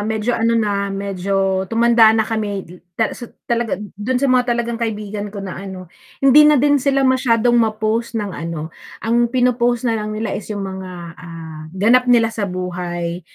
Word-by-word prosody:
medyo 220 +2 -1
ano 230 0 +1
na, 200 -3 0
medyo 195 -1 -1
tumanda 230 0 +5
na 220 - +2
kami 210 -3 -3
dil 180 +1 -14 0.2
tala 225 - +1
su 240 - -8 0.7
do'n 250 +5 0
sa 275 +3 +1
mga 250 -1 +3
talagang 235 0 -3
kaibigan 210 -2 -3
ko 200 -1 -7
na 185 -1 -6
ano, 185 -3 -9 0.3
hindi 300 +3 +7
na 300 - +5
din 285 +1 +3
sila 275 0 +2
masyadong 245 -3 +3
ma-post 220 +1 -1
ng 205 -3 -3
ano. 165 -2 -5 0.3
Ang 235 +1 +2
pino-post 245 -1 +1
na 235 - +2
lang 215 -1 -3
nila 215 -1 -3
is 210 - -5
'yong 205 -2 -4
mga, 190 -1 -6 0.3
ah, 165 -2 -9 0.2
ganap 245 +6 +4
nila 230 -2 +4
sa 205 -3 -3
buhay. 175 -1 -4
215 Hz, 175 wpm, -19 LUFS, 195-235 Hz, 0.7 s, hindi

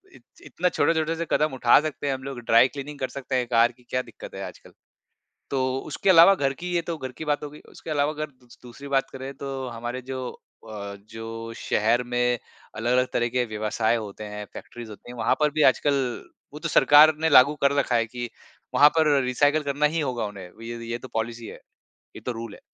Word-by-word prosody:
इ - - -15 0.3
इतना 180 +1 0
छोटे-छोटे 165 -1 +1
से 170 +1 -3
कदम 155 -2 +2
उठा 120 -2 +5
सकते 150 -2 -4
हैं 140 - +1
हम 130 0 -6
लोग 135 -2 -6
ड्राई 115 +1 +5
क्लीनिंग 140 +2 -8
कर 130 - -1
सकते 135 -1 -4
हैं 125 -1 0
कार 120 0 +4
की 125 +1 -25
क्या 125 - 0
दिक्कत - - -11
है - - -5
आजकल। - - -14 0.8
तो 135 - 0 0.3
उसके 190 - +1
अलावा 170 +2 +8
घर 140 -7 0
की 180 +1 -4
ये 170 - +3
तो 165 0 -4
घर 130 -3 -6
की 160 - -6
बात 145 -1 0
हो - - -5
गई। 150 - -13
उसके - - -10
अलावा 145 0 +1
अगर 155 0 -4
दू 130 -2 -27 0.2
दूसरी 125 +3 -11
बात 135 -1 +1
करें 135 +1 -7
तो 135 -2 -5
हमारे 120 +2 -5
जो 130 0 -5 0.4
अ, 100 -2 -7
जो 115 0 -7
शहर 115 +3 +1
में 125 0 0 0.4
अलग-अलग 125 +3 +2
तरह 120 0 +1
के 125 +1 0
व्यवसाय 110 +1 0
होते 105 -1 -6
हैं 105 0 -6
फैक्ट्रीज़ 120 -2 -9
होती 105 +3 -12
हैं 125 - -9
वहाँ - - +2
पर 150 0 +3
भी 155 +1 +1
आजकल 140 +2 0 0.6
वो 150 - -8
तो - - -2
सरकार 150 +2 +7
ने 160 - +2
लागू 140 +1 +7
कर 140 0 +4
रखा 130 -3 +1
है 115 0 +1
कि 120 +1 -6 0.5
वहाँ 145 - +8
पर 160 -1 +4 0.2
रिसाइकिल 145 +4 +2
करना 145 +1 +1
ही - - +2
होगा 125 -6 -2
उन्हें 100 -3 -9
वि 115 +1 -8 0.2
ये 120 - -2
तो 130 - -10
पॉलिसी 115 +1 -3
है, - - -10 0.6
ये - - -9
तो 125 - -1
रूल 115 -2 -7
है। - - -16
130 Hz, 225 wpm, -25 LUFS, 115-145 Hz, 0.8 s, अलावा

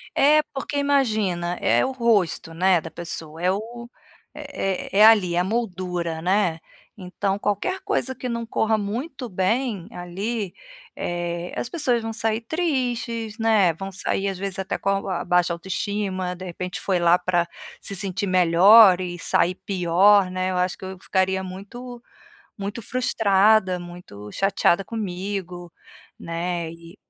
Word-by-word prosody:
É, 300 +2 +5
porque 275 +1 -4
imagina, 215 -11 +1
é - - +3
o 265 - -2
rosto, 210 -9 +1
né, 180 0 +3
da - - -9
pessoa. 165 -1 -6
É 180 +1 +3
o 235 +4 -6 0.4
é 195 0 -4
é 215 - +9
ali 195 -6 +5
é - - +2
a - - +2
moldura, 180 -6 -3
né, 180 -2 +1 0.4
então 195 +1 -2
qualquer 210 - -2
coisa 380 -10 -1
que 250 - -5
não 235 0 -3
corra 220 -1 +1
muito 245 +6 -4
bem 200 0 -1
ali, 195 +3 -4 0.4
eh, 175 0 -4
as - - -2
pessoas 250 -5 0
vão 225 0 -4
sair 220 0 0
tristes, 240 -7 -2
né, 215 -6 +3
vão 195 +4 -7
sair 195 +1 -2
às 190 - -5
vezes 195 0 -4
até 190 - -2
com 195 - -2 0.2
a - - -2
baixa 180 -1 +2
autoestima, 190 +1 -3
de 185 +1 -9
repente, 180 +1 -5
foi 190 -2 0
lá 170 +1 +5
pra 175 -2 +1 0.4
se 200 - -6
sentir 195 +1 -2
melhor 185 +3 +7
e 175 -1 -4
sair 180 +2 +2
pior, 190 +1 +4
né. 185 0 -1
Eu 180 - -2
acho 180 0 0
que 190 - -9
eu 190 0 -7
ficaria 190 0 0
muito 235 +7 -9 0.6
muito 200 +4 -5
frustrada, 210 -5 +2
muito 175 - -10
chateada 195 -1 +2
comigo, 185 -4 -5 0.5
né, 170 0 -3
e 170 +3 -14
195 Hz, 150 wpm, -23 LUFS, 180-225 Hz, 0.6 s, é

